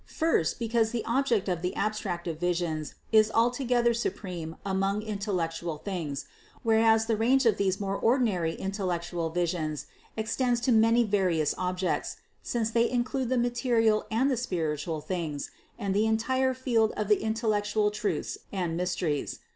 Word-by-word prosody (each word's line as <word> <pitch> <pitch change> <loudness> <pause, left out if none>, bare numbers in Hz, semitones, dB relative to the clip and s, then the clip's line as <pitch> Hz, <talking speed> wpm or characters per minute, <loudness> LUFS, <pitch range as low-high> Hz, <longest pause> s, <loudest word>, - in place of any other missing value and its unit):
First, 320 - +1
because 230 -1 +1
the 235 0 -3
object 235 -4 +1
of 180 -3 -1
the 180 +1 -2
abstractive 175 -6 -2
visions 170 -3 -1 0.2
is 215 -1 +5
altogether 240 +1 +2
supreme 180 -7 -4
among 195 +2 0
intellectual 175 -6 -2
things, 160 -6 -4 0.4
whereas 225 0 +4
the 225 -1 +1
range 250 +5 +3
of 220 -4 +4
these 190 -1 +1
more 195 -1 -2
ordinary 210 -9 +1
intellectual 175 -4 -2
visions 160 -4 -2 0.3
ex 220 0 -2
tends 245 -2 +1
to 250 - +2
many 230 +1 +5
various 185 -8 +1
objects, 180 0 -2 0.2
since 225 -2 -1
they 235 +1 +3
include 250 +1 -1
the 255 - +1
ma 240 0 +2
terial 235 -3 +2
and 255 +5 +2
the 255 - +1
spiritual 160 -7 -2
things, 160 -5 -4 0.3
and 200 -4 -2
the 210 +2 +2
entire 260 +4 +1
field 235 -4 +1
of 210 0 -1
in 220 +1 +2
tellectual 210 -2 +1
truths 210 0 -2
and 180 -4 -2
mysteries. 175 -4 -1
210 Hz, 150 wpm, -28 LUFS, 175-230 Hz, 0.4 s, is